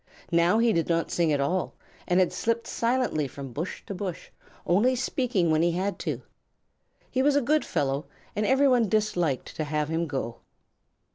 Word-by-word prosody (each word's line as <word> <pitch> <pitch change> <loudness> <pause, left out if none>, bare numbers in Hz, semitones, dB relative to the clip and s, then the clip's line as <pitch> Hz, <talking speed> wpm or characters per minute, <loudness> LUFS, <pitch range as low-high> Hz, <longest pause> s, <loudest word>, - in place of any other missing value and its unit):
Now 170 +4 +4
he 230 0 +3
did 165 -2 0
not 165 0 +1
sing 170 -2 +2
at 145 - +1
all, 175 +7 -1 0.3
and 180 0 +3
slipped 230 0 -1
silently 235 - 0
from 135 -2 -8
bush 160 +7 -5
to - - -5
bush, 185 -2 -5 0.3
only 225 +9 +3
speaking 245 - 0
when 155 0 +3
he 170 0 +2
had 190 +3 -2
to. - - -3 0.9
He 260 - +1
was 285 +1 +3
a - - +5
good 295 +3 +2
fellow 140 +2 -1 0.3
and 210 - 0
everyone 255 -2 +4
disliked 180 -10 0
to 155 - -1
have 150 0 -1
him 165 +1 -1
go. 125 -5 -4
180 Hz, 170 wpm, -27 LUFS, 155-230 Hz, 0.9 s, a